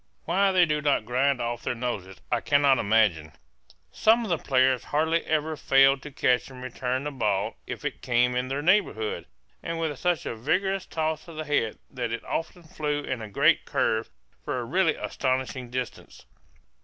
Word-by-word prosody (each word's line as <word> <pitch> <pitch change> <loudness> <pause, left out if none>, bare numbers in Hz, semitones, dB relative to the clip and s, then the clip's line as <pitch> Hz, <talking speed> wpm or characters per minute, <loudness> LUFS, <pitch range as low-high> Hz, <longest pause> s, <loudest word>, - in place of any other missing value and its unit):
Why 195 +4 +3
they 185 -2 +5
do 150 -2 -1
not 145 -7 +1
grind 130 +3 +1
off 120 0 -3
their - - -2
noses 105 -6 -4
I 120 -1 +1
cannot 140 -2 +4
imagine. 100 -8 +2 0.6
Some 225 - +3
of 220 - -5
the 170 -3 +1
players 130 -2 +2
hardly 160 +3 +1
ever 155 0 0
failed 135 -1 +4
to 150 - -8
catch 125 -3 +1
and 130 -1 -11
return 130 +1 -2
the 150 - -3
ball 105 -7 -1
if - - -6
it - - -4
came 125 0 +2
in 125 +1 -1
their 140 +2 -3
neighborhood, 210 - +1 0.3
and 165 -1 -4
with 160 -3 -1
such 175 -2 0
a - - -3
vigorous 190 - 0
toss 155 0 -2
of 165 - -10
the 155 0 -4
head 135 -7 0
that 125 -3 -3
it 115 - -4
often 170 +2 -4
flew 150 -3 -3
in 130 -4 -3
a 110 - -7
great 145 +9 +3
curve 115 -5 0 0.3
for - - -2
a - - -4
really - - +2
astonishing 130 -1 -2
distance. 125 0 -6
135 Hz, 185 wpm, -26 LUFS, 125-160 Hz, 0.6 s, they